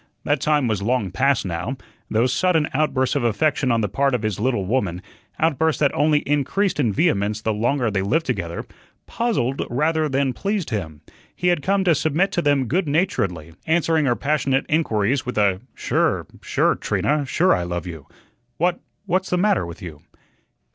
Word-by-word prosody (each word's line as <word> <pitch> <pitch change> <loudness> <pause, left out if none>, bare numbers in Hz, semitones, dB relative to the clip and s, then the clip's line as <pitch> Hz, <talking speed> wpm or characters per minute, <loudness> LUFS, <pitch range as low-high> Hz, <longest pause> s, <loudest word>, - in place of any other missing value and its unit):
That 145 -2 0
time 150 -4 +2
was 105 -3 -1
long 110 -3 0
past 135 +3 +1
now. 90 +9 -3 0.3
Those 120 +3 +1
sudden 165 0 +2
outbursts 130 -2 +1
of 140 - 0
affection 130 +3 +1
on 115 -1 +2
the 105 - 0
part 135 +6 +1
of 115 - -3
his 105 -2 -2
little 120 -4 0
woman, 95 -5 -1 0.4
outbursts 160 0 +1
that 140 -2 +2
only 150 0 +2
increased 150 +7 0
in 120 -7 +2
vehemence 105 - +1
the 110 0 -1
longer 120 +2 0
they 95 -1 0
lived 160 +12 0
together, 90 -9 -3 0.4
puzzled 205 - -1
rather 155 +4 +1
than 135 -1 0
pleased 200 -2 -2
him. 80 -9 -4 0.3
He 180 - +1
had 175 -4 +1
come 195 +5 +1
to 175 -3 +4
submit 160 +6 +1
to 175 - 0
them 145 -4 +2
good 170 - 0
naturedly, 105 - -1
answering 160 -1 +2
her 120 -3 +2
passionate 140 -2 0
inquiries 135 -5 +1
with 125 - -5
a 100 -2 +2
"Sure, - - 0 0.2
sure, - - +1
Trina, 150 0 0
sure 175 +7 +3
I - - 0
love 85 0 -4
you. 80 -5 -8 0.5
What 175 +2 +1 0.3
what's 190 0 0
the 180 - +1
matter 200 - +2
with 85 +4 -10
you?" 80 -4 -9
135 Hz, 180 wpm, -22 LUFS, 105-160 Hz, 0.5 s, to